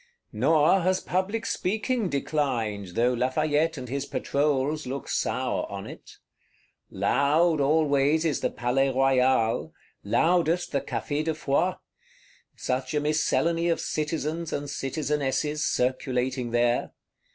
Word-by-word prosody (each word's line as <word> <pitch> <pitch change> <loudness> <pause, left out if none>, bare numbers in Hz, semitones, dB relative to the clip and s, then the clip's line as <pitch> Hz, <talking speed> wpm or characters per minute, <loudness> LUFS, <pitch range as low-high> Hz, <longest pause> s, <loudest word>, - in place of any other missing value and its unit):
Nor 155 - +3
has 185 +2 +1
public 200 +5 -2
speaking 220 +2 -1
declined, 120 - -2
though 120 +2 +2
Lafayette 150 +5 +1
and 130 -1 -6
his 140 +3 -3
Patrols 145 +1 0
look 135 +2 -5
sour - - -1
on - - -6
it. - - -12 0.7
Loud 150 +3 +2
always 150 +1 +2
is 150 -5 +1
the - - 0
Palais 125 +2 0
Royal, 130 -3 +2 0.3
loudest 175 0 +2
the 140 - 0
Café 145 +1 -3
de 160 -1 -1
Foy; 155 +5 +1 0.8
such 130 +2 -2
a - - +3
miscellany 165 +3 +1
of 165 - +1
Citizens 155 +1 -2
and 145 0 -3
Citizenesses 150 +1 -1
circulating 125 0 -1
there. 120 +1 +1
145 Hz, 120 wpm, -26 LUFS, 130-160 Hz, 0.8 s, Nor